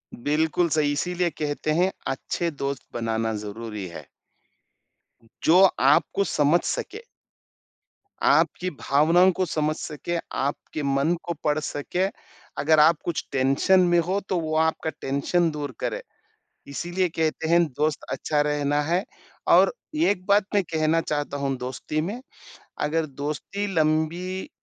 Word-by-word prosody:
बिल्कुल 155 +6 +1
सही, 150 -2 +2
इसीलिए 175 +3 0
कहते 150 -1 -3
हैं 185 +2 +3 0.2
अच्छे 170 +5 -3
दोस्त 140 -1 -4
बनाना 115 -1 -1
ज़रूरी 105 -1 -6
है। 85 - -9 1.4
जो 170 +3 +6 0.2
आपको 145 +8 +3
समझ 150 -2 +3
सके। 430 - -3 1.3
आपकी 185 +1 +2
भावनाओं 165 +6 +4
को 185 +1 -1
समझ 155 -2 -1
सके, 160 +4 -4
आपके 145 +2 -3
मन 140 +4 +1
को 170 - -3
पढ़ 150 0 +1
सके। 155 +5 -2 0.6
अगर 155 +1 +4
आप 155 +2 +6
कुछ 170 - -2
टेंशन 135 +7 +3
में 175 0 +4
हो 195 +2 +1
तो 185 - +1
वो 155 -1 -2
आपका 160 0 +1
टेंशन 140 +6 +1
दूर 145 -2 -4
करे, - - -2 0.7
इसीलिए 175 +6 -1
कहते 160 0 -1
हैं 170 +1 +5
दोस्त 150 +1 -2
अच्छा 145 +3 0
रहना 145 0 0
है 175 +6 0 0.5
और - - +6 0.2
एक 205 - +1
बात 200 0 +4
मैं 200 - +4
कहना 160 0 +1
चाहता 145 -3 -3
हूँ 140 -1 -1
दोस्ती 130 +4 -3
में, 200 +10 -4 0.6
अगर 160 +2 0
दोस्ती 150 +8 -4
लंबी 165 - 0
155 Hz, 135 wpm, -25 LUFS, 145-175 Hz, 1.4 s, जो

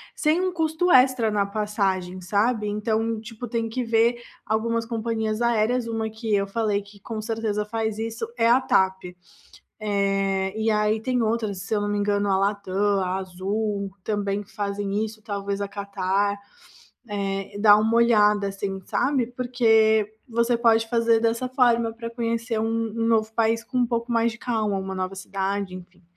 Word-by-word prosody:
sem 310 +2 +2
um 370 -1 -1
custo 325 +1 +1
extra 255 -4 +5
na 205 -1 +2
passagem, 195 -3 -2
sabe. 210 +4 +1
Então, 220 +2 -1
tipo, 225 +2 -8
tem 230 0 -2
que 250 +3 -2
ver 230 +1 +2 0.2
algumas 230 +1 0
companhias 225 -1 -2
aéreas, 235 +1 +1
uma 225 -1 -2
que 220 0 -4
eu 200 0 +1
falei 210 -1 0
que 200 0 -17
com 220 +2 -6
certeza 215 -2 -2
faz 220 0 -2
isso 225 0 -4
é 230 -1 +3
a 250 +3 +5
TAP, 190 -6 +1 0.8
eh, 195 -2 0
e 220 0 +1
aí 210 0 +2
tem 250 +1 0
outras 220 -3 -1
se 200 +3 -2
eu 210 - +1
não 205 - -1
me 205 - 0
engano 205 0 +1
a 190 - +3
Latam, 200 -1 -1 0.3
a 185 0 -1
Azul, 200 +2 -3
também 205 -1 -1
fazem 205 0 -2
isso. 215 0 -9
Talvez 200 -1 -3
a 200 - -2
Qatar, 200 0 -1 0.7
eh, 195 -1 -3
dá 205 0 +7
uma 220 +2 +2
olhada 210 -3 +4
assim, 195 0 -4
sabe, 270 -3 +1
porque 225 -4 +2 0.2
você 235 +1 +1
pode 225 -1 +3
fazer 230 -1 +3
dessa 230 +2 0
forma 240 -3 +2
pra 230 0 -7
conhecer 230 -1 -2
um 225 +1 -1
um 225 - +1
novo 220 -1 +2
país 225 0 +1
com 255 +2 -3
um 245 - +3
pouco 235 0 -2
mais 230 0 +2
de 235 - -11
calma, 220 -5 -1
uma 190 0 -4
nova 185 0 -3
cidade, 195 0 -3
enfim. 180 0 -12
220 Hz, 170 wpm, -24 LUFS, 200-230 Hz, 0.8 s, dá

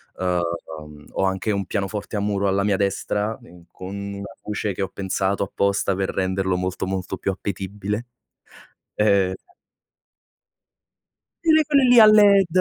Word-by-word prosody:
Uhm, 85 -4 -4
ho - - -1
anche 95 +3 -1
un 100 -1 -1
pianoforte 105 +2 -3
a - - 0
muro 100 -1 0
alla 100 +1 +1
mia 100 -1 +2
destra 105 +2 -1
in 85 0 -16
con 95 +2 -8
una 100 0 -6 0.2
luce 105 -1 -3
che 95 - -5
ho 95 - -1
pensato 95 +1 -1
apposta 100 0 0
per 95 0 -2
renderlo 95 0 -1
molto, 90 +1 -3
molto 95 -1 -4
più 95 - -1
appetibile, 100 +3 -4 0.9
ehm 100 -3 +2 2.1
Quelle 315 -2 +5
quelle 285 -2 +3
lì 245 -1 +7
a 220 - +10
led, 205 -3 +6
100 Hz, 145 wpm, -22 LUFS, 95-105 Hz, 2.1 s, a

